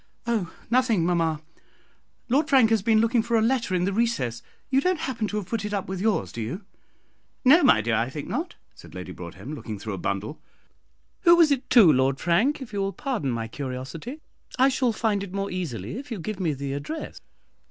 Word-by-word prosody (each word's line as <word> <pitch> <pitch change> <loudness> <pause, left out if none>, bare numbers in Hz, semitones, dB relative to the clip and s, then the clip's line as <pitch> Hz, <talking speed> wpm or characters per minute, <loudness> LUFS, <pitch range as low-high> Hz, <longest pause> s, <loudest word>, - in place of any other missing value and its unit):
"Oh, 220 -8 -1 0.2
nothing, 235 -8 +3
mamma. 165 -3 0 0.8
Lord 290 +6 +2
Frank 260 -6 +5
has 225 -3 +3
been 220 +1 +3
looking 230 +1 +3
for 230 +1 +1
a - - +3
letter 230 -5 +1
in 180 0 +1
the 195 - -1
recess. 200 - 0 0.3
You 270 +1 +4
don't 365 -1 0
happen 230 -5 -2
to 210 - -3
have 205 - -3
put 220 +2 -3
it 210 0 -2
up 195 - -3
with 190 -1 -4
yours, 220 0 0
do 115 - -6
you?" 160 - -5 0.8
"No, 300 +7 +7
my 180 - +5
dear, 115 +2 -1
I 115 +3 +1
think 145 +1 -6
not," 325 +9 -3 0.2
said - - -15
Lady - - -7
Broadhem, - - -8
looking 110 -7 -6
through 110 +1 -5
a 95 - -5
bundle. 100 - -3 0.8
"Who 345 -3 +6
was 335 -3 +5
it 270 -2 -1
to, 205 -11 +7
Lord 130 +1 +2
Frank, 235 - +1
if 235 - -13
you 200 - -2
will 195 0 -1
pardon 245 - -2
my 115 -2 -2
curiosity? 140 - -6 0.4
I 260 +1 +5
shall 255 -2 +1
find 215 -2 0
it 195 -1 -8
more 200 0 -2
easily 165 - -4
if 280 - -10
you 230 - -4
will 170 - -8
give 215 +1 -4
me 165 -5 0
the 135 0 -4
address." 225 - -6
200 Hz, 215 wpm, -25 LUFS, 145-245 Hz, 0.8 s, No